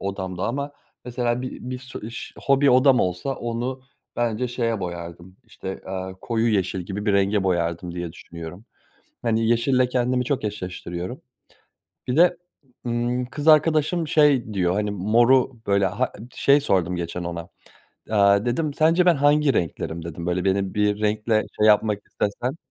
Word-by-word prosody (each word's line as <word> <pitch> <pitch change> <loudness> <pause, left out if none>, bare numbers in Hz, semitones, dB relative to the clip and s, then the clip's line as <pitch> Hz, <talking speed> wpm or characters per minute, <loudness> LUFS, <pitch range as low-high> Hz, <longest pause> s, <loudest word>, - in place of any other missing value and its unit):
odamda 95 -2 -4
ama 140 +4 -3 0.3
mesela 120 0 -1
bi 130 - -6
bir 125 - -4
su 130 -4 -9
iş 115 - -8
hobi 140 0 +3
odam 130 0 +5
olsa 90 +9 -1
onu 120 +3 -4 0.3
bence 120 +1 0
şeye 115 -3 -1
boyardım, 85 0 -7
işte, 95 0 -8
aaa, 95 0 -4
koyu 115 0 0
yeşil 95 -1 0
gibi 100 +4 -5
bir 100 - +3
renge 100 0 +2
boyardım 85 -1 -1
diye 85 -2 -5
düşünüyorum. 85 +3 -10 0.6
Hani, 115 -1 +1
yeşille 125 +2 +2
kendimi 125 0 0
çok 130 -3 -1
eşleştiriyorum. 90 0 -5 0.9
Bir 125 +4 -1
de, 175 0 +5 0.5
ımm, 120 +1 -1
kız 145 +4 -6
arkadaşım 155 +1 +4
şey 145 -8 +3
diyor, 90 -2 +1
hani, 105 +1 -1
moru, 120 +7 +3 0.2
böyle, 100 -1 +3
ha 105 +7 -1
ın 120 +4 -11
Şey 140 +1 +4
sordum 90 - +1
geçen 85 +1 -4
ona, 85 -1 -5 0.6
aaa, 100 0 +4
dedim, 145 +5 -1
"Sence 165 +4 +3
ben 175 -3 +5
hangi 145 0 +3
renklerim?" 85 -2 -3
dedim, 85 0 -6
"Böyle, 90 0 -1
beni 95 0 0
bir 105 0 +1
renkle 110 +1 +1 0.2
şey 105 - +5
yapmak 105 -1 +3
istesen" 125 +8 -3
110 Hz, 155 wpm, -23 LUFS, 95-130 Hz, 0.9 s, odam